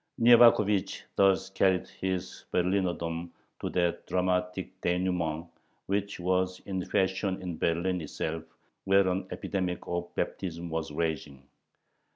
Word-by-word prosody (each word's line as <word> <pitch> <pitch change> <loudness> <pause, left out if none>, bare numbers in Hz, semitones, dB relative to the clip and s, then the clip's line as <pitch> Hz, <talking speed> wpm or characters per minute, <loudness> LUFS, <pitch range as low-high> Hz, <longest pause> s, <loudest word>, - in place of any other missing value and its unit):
Nyevakhovich 115 -4 +5
thus 95 0 +3
carried 95 -2 +2
his 95 -1 -4
"Berlinerdom" 85 -2 0 0.3
to - - -3
that 85 -1 0
dramatic 90 0 -1
dénouement 90 -2 0 0.4
which 100 0 -2
was 90 +1 0
in 95 -2 -3
fashion 95 0 0
in 90 -3 -4
Berlin 85 +2 +1
itself, 80 +1 -4 0.4
where 95 0 +5
an 95 +1 -1
epidemic 90 -2 -3
of 85 0 -3
baptism 85 -2 -3
was 80 -1 -2
raging. 75 -4 -3
90 Hz, 115 wpm, -29 LUFS, 85-95 Hz, 0.4 s, Nyevakhovich